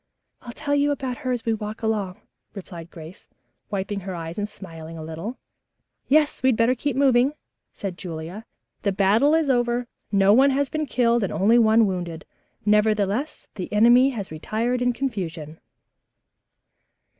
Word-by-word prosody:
"I'll 240 - -9
tell 285 +2 -3
you 285 0 +3
about 265 -3 -2
her 260 -4 -3
as 245 -2 -2
we 225 - +1
walk 215 +1 -6
along," 210 -3 -2 0.3
replied 175 -4 -9
Grace, 165 +1 -12 0.4
wiping 200 0 -3
her 190 -1 -6
eyes 165 +2 -6
and 205 0 -2
smiling 165 -5 -10
a 160 - -7
little. 165 +10 -6 0.7
"Yes, 300 +1 +3
we 260 - +2
had 240 - +2
better 230 +2 +3
be 275 +1 -2
moving," 265 0 +3 0.4
said 190 -3 -6
Julia. 175 +4 -7 0.4
"The 200 - 0
battle 215 +10 +4
is 320 -2 +1
over. 240 -1 +1 0.3
No 200 0 +5
one 270 +5 +6
has 275 +1 0
been 310 -1 -2
killed 235 -1 +2
and 195 - -1
only 225 +5 +4
one 225 0 +5
wounded. 175 -4 -4 0.4
Nevertheless, 210 +5 +1
the 185 -4 -6
enemy 240 +5 +6
has 210 -10 -5
retired 225 +10 -2
in 245 0 +2
confusion." 175 - -4
220 Hz, 160 wpm, -24 LUFS, 190-250 Hz, 0.7 s, one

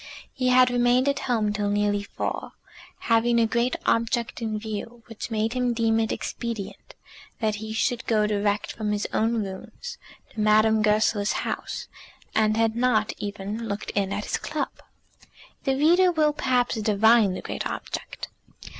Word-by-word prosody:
He 255 -1 -1
had 250 0 +5
remained 245 +2 +3
at 280 0 +1
home 215 -4 +1
till 205 -1 -1
nearly 205 0 +1
four, 205 - -4 0.5
having 235 +1 +3
a 230 - +4
great 235 +2 0
object 230 +1 0
in 220 -2 -2
view, 220 +2 -6
which 225 -1 -7
made 220 0 0
him 250 -1 0
deem 225 -1 +2
it 220 -1 0
expedient 230 -5 -5 0.4
that 215 -2 0
he 220 +1 -6
should 230 +3 -1
go 215 -2 +3
direct 205 0 0
from 210 -1 -2
his 205 0 -1
own 225 0 +1
rooms 340 - -8 0.3
to 225 - -8
Madame 215 +1 +4
Goesler's 210 -1 +2
house, - - -4 0.5
and 215 0 +2
had 225 -1 +2
not 235 -3 +2
even 205 +2 -4
looked 205 0 -4
in 200 -1 -1
at 205 +1 -3
his - - -1
club. - - -3 0.9
The 270 -1 +2
reader 350 +5 +5
will, 305 -3 +2
perhaps, 250 -5 0
divine 215 -1 +4
the - - -5
great - - -3
object. - - -6
225 Hz, 160 wpm, -25 LUFS, 210-240 Hz, 0.9 s, had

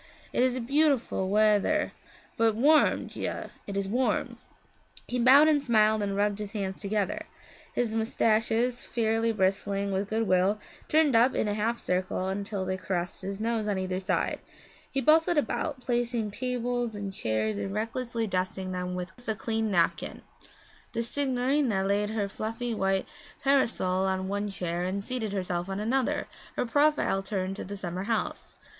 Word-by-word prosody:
It - - +2
is 255 0 +2
beautiful 270 -6 +1
wea 210 0 +5
thir, 305 +7 0 0.4
but 225 -2 +2
warm. 295 +7 +4
Già, - - -5 0.2
it 200 -1 -4
is 200 -1 -1
warm.' 245 +5 0 0.7
He 250 - -1
bowed 270 +5 +7
and 295 -2 +3
smiled 215 -4 +4
and 200 -1 -1
rubbed 205 0 +1
his 210 0 -5
hands 195 -3 -3
together. 205 -1 -1 0.5
His 235 -3 0
moustaches, 225 +2 +1
fairly 225 0 +1
bristling 200 0 0
with 195 +1 -1
good 225 +1 0
will, 185 +3 +3 0.3
turned 305 -4 +3
up 240 +3 +5
in - - +1
a 205 - 0
half 220 +3 0
circle 185 0 -1
until 200 0 -3
they 185 0 -1
caressed 180 -2 -3
his 195 +1 -4
nose 225 -1 -1
on 205 -2 0
either 185 0 -2
side. 190 - 0 0.5
He 270 - -1
bustled 320 +4 +4
about 290 -1 -1
placing 240 -3 -1
table 245 +1 -1
and 200 -1 -5
chairs, 110 - -1
and 195 - -3
recklessly 230 +2 -2
dusting 185 -1 -2
them 180 0 -3
with 180 +1 -5
the 235 -3 -3
clean 220 +1 -1
napkin. 170 -4 0 0.7
The 230 - -1
signorina 255 -4 +1
laid 200 +1 +1
her 215 -2 -1
fluffy 225 +4 -4
white 195 -2 +1 0.4
parasol 225 -9 +2
on 190 0 -1
one 205 +1 -2
chair 175 -2 -3
and 190 +2 -2
seated 230 -3 -3
herself 180 -2 -2
on 195 +1 -3
another, 250 +4 0 0.3
her - - 0
profile 285 -5 +2
turned 195 -1 -3
to - - -4
the 200 +1 -6
summer 185 0 -4
house. 225 0 -3
215 Hz, 165 wpm, -28 LUFS, 195-245 Hz, 0.7 s, bowed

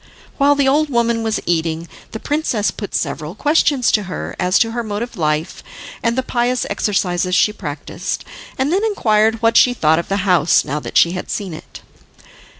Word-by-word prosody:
While 285 +1 +4
the 280 -1 +2
old 295 +3 +2
woman 235 -2 +1
was 220 -1 -1
eating, 165 0 -1 0.2
the 220 - -7
princess 285 -8 -1
put 205 - -6
several 150 +3 -3
questions 290 -2 +2
to 210 -2 +1
her - - -5
as 180 0 +2
to 225 - +2
her 240 +1 -2
mode 215 -1 -3
of 240 - -8
life, 155 -1 -2 0.4
and 230 +1 0
the 260 - +1
pious 245 0 0
exercises 180 -3 0
she 210 - +3
practiced, 150 -8 -5 0.3
and 270 +5 0
then 395 +3 +1
inquired 225 - +1
what 230 0 +4
she 250 -1 +5
thought 160 -5 +3
of 170 - -5
the 195 0 -1
house 175 -4 +3
now 145 +3 -2
that - - -3
she 170 - +5
had 180 0 -6
seen 195 -5 -4
it. 155 - -11
215 Hz, 190 wpm, -18 LUFS, 175-245 Hz, 0.4 s, she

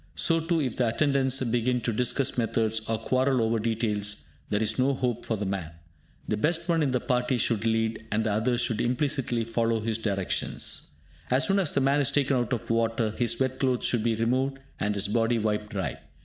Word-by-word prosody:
So 165 -1 +3
too, 165 +1 0
if 130 -6 -2
the 125 - +2
attendants 135 +1 +1
begin 120 +1 +1
to 115 - -1
discuss 125 +3 0
methods, 115 -1 0
or 115 - +1
quarrel 130 +3 +1
over 115 0 +1
details, 105 -2 -1 0.3
there 105 - +1
is 110 - -1
no 135 +2 +3
hope 125 -3 -2
for 110 - 0
the 105 - -3
man. 95 -4 -3 0.6
The 105 - 0
best 165 +8 0
one 165 -2 +2
in 145 - +2
the 125 -1 +1
party 125 +1 0
should 115 -1 +1
lead, 110 0 0
and 110 +1 +1
the 110 - 0
others 120 +4 +1
should 120 -2 0
implicitly 125 -1 0
follow 115 0 0
his 110 0 -2
directions. 100 -4 -2 0.4
As 130 +4 +3
soon 195 0 +2
as 175 -7 +2
the 140 - +2
man 135 +2 +3
is 140 - +2
taken 140 -1 +2
out 120 -1 0
of 120 -2 -2
water, 115 -1 +1
his 120 +1 -1
wet 130 0 0
clothes 130 -2 +1
should 120 - +1
be 115 0 +1
removed, 130 +4 0 0.2
and 105 0 0
his 100 0 0
body 115 +2 +1
wiped 105 -1 -1
dry. 95 - -3
115 Hz, 210 wpm, -27 LUFS, 110-130 Hz, 0.6 s, So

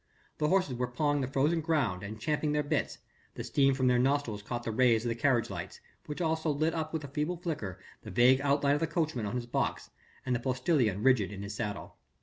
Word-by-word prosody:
The 150 - +2
horses 185 -5 +2
were 125 0 -1
pawing 145 +3 0
the 130 - -1
frozen 145 +5 +1
ground 140 - 0
and 105 +2 -7
champing 150 +4 0
their 150 0 +1
bits 145 0 -1 0.4
the - - -5
steam 135 -1 +2
from 130 -1 0
their 125 -1 +4
nostrils 130 -5 +1
caught 120 +3 -5
the 115 - -2
rays 115 0 +3
of - - 0
the - - +1
carriage 120 -1 +1
lamps, - - -6 0.3
which 150 +4 -5
also 160 -1 0
lit 155 +3 +1
up 160 -1 -3
with 160 -2 -3
a - - -6
feeble 150 +5 -2
flicker 145 - -4 0.2
the 110 - -9
vague 125 +6 +5
outline 140 0 +2
of 145 - +1
the 165 - 0
coachman 155 -8 -1
on 100 - -4
his 125 -1 -2
box 120 - -2 0.3
and 130 -1 +1
of 120 - -2
the - - -18
postilion 125 - +1
rigid 125 -7 +3
in 100 0 -7
his 100 0 -5
saddle. 105 -1 -5
135 Hz, 235 wpm, -30 LUFS, 120-150 Hz, 0.4 s, vague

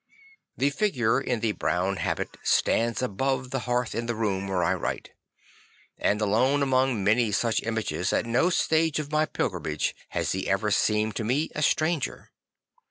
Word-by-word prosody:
The 140 +2 +2
figure 135 - +1
in 125 -4 -2
the 115 - +1
brown 95 -1 -1
habit - - -2
stands 115 +2 +1
above 130 +3 -1
the 135 - -1
hearth 120 -1 0
in 115 +2 -3
the 120 - -1
room 100 -3 -1
where 95 -2 0
I - - +2
write, - - -4 0.8
and 105 - 0
alone 125 +7 +2
among 130 -5 +1
many 110 +2 +3
such 115 +3 +1
images, 110 -5 -2
at - - +1
no 120 +9 +2
stage 160 -3 +2
of 150 -1 -4
my 155 0 +2
pilgrimage 80 -7 -2
has - - -1
he - - -2
ever - - +1
seemed 105 0 +1
to 115 - -2
me 135 +8 0
a 150 - -3
stranger. 155 0 0
120 Hz, 165 wpm, -26 LUFS, 105-135 Hz, 0.8 s, many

